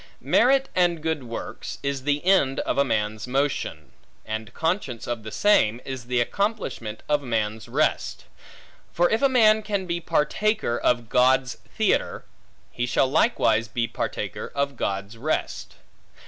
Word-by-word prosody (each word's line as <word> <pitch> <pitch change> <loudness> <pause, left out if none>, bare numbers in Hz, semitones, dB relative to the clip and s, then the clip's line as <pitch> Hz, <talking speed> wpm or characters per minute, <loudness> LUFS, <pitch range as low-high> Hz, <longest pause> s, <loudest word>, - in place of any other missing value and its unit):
Merit 270 +2 +4
and 175 -2 +2
good 160 -4 -2
works, 115 -1 -6
is 140 -1 -2
the 145 +2 0
end 160 -9 +3
of 140 - +1
man's 110 -3 -2
motion; 135 - -2 0.3
and 110 0 -5
conscience 160 - -2
of 120 -2 -3
the 110 0 -8
same 120 - +3
is 130 -2 -6
the 125 0 0
accomplishment 120 - -2
of 150 -1 +2
man's 110 -4 -2
rest. - - 0 0.7
For 175 +1 +2
if 220 - +1
a 275 - +4
man 220 -4 +5
can 205 -3 -2
be 170 -1 -2
partaker 210 - 0
of 120 -1 +1
God's 125 +1 +3 0.2
theatre, - - 0 0.5
he 120 0 -2
shall 130 - +2
likewise 115 - +2
be 115 +1 -1
partaker - - -4
of 140 0 -1
God's 100 0 -3
rest. 155 +6 -3
135 Hz, 145 wpm, -24 LUFS, 115-175 Hz, 0.7 s, man